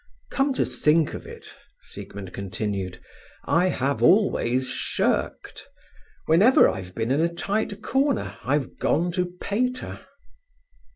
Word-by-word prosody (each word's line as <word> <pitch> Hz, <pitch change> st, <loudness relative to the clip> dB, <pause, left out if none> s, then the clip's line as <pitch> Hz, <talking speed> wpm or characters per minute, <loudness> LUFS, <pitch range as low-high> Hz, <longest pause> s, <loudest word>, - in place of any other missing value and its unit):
"Come 275 Hz, +1 st, +1 dB
to -, -, +1 dB
think 155 Hz, 0 st, +2 dB
of -, -, -8 dB
it," -, -, -11 dB, 0.3 s
Siegmund 95 Hz, -2 st, -9 dB
continued, 100 Hz, -1 st, -4 dB, 0.5 s
"I 175 Hz, +3 st, +3 dB
have 140 Hz, -5 st, -1 dB
always 130 Hz, -, +3 dB
shirked. -, -, -2 dB, 0.6 s
Whenever 195 Hz, +11 st, +6 dB
I've 90 Hz, -1 st, -5 dB
been 115 Hz, +2 st, -1 dB
in 140 Hz, +4 st, +2 dB
a 170 Hz, +1 st, +1 dB
tight 205 Hz, +4 st, -2 dB
corner 270 Hz, -2 st, 0 dB
I've 135 Hz, 0 st, -1 dB
gone 175 Hz, +3 st, +1 dB
to 180 Hz, 0 st, 0 dB
Pater." 250 Hz, +5 st, -2 dB
165 Hz, 120 wpm, -25 LUFS, -, 0.6 s, Whenever